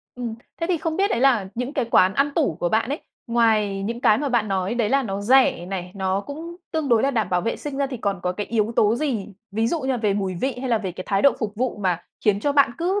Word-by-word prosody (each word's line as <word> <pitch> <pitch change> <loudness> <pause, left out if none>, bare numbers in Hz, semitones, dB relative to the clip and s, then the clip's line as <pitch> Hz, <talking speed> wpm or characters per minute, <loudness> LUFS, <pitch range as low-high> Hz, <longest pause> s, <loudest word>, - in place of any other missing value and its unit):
Ừm, 240 -2 -4 0.3
thế 330 - 0
thì 360 0 +1
không 320 0 -2
biết 395 +1 +2
đấy - - 0
là 245 -8 +3
những 250 +3 -3
cái 270 -4 0
quán 190 -5 +4
ăn 280 +1 +2
tủ 160 - +1
của 175 - +1
bạn 220 +4 +1
ấy, 285 +3 -3 0.3
ngoài 220 -4 +2
những 230 +4 -3
cái 215 -3 +4
mà 290 - -1
bạn 235 -4 +1
nói 190 +2 -1
đấy 235 -3 +1
là 275 +3 +2
nó 200 -4 -3
rẻ 250 -6 +4
này, 180 -1 -5
nó 190 0 0
cũng 320 +9 -8 0.2
tương 315 -3 -1
đối 230 -3 +4
là 275 - +2
đảm 220 -7 0
bảo 180 -1 +2
vệ 230 - -2
sinh 290 -2 -6
ra 280 0 +1
thì 265 -1 -5
còn 200 -5 -2
có 180 - 0
cái 205 +3 -4
yếu 225 -1 0
tố 210 +1 +4
gì, 240 -7 -2 0.2
ví 220 +3 0
dụ 325 +7 -1
như 265 - -4
là 260 - +1
về 210 -4 0
mùi 195 -2 -2
vị 255 +8 -2
hay 260 - -3
là 230 -2 +2
về 190 -4 -4
cái 185 +1 -7
thái 195 -1 +1
độ 280 - +6
phục 215 -4 -3
vụ 250 +2 -1
mà 180 -4 0 0.2
khiến 205 -2 +3
cho 285 +5 +1
bạn 280 -4 +4
cứ 370 +4 0
230 Hz, 290 wpm, -23 LUFS, 195-270 Hz, 0.3 s, độ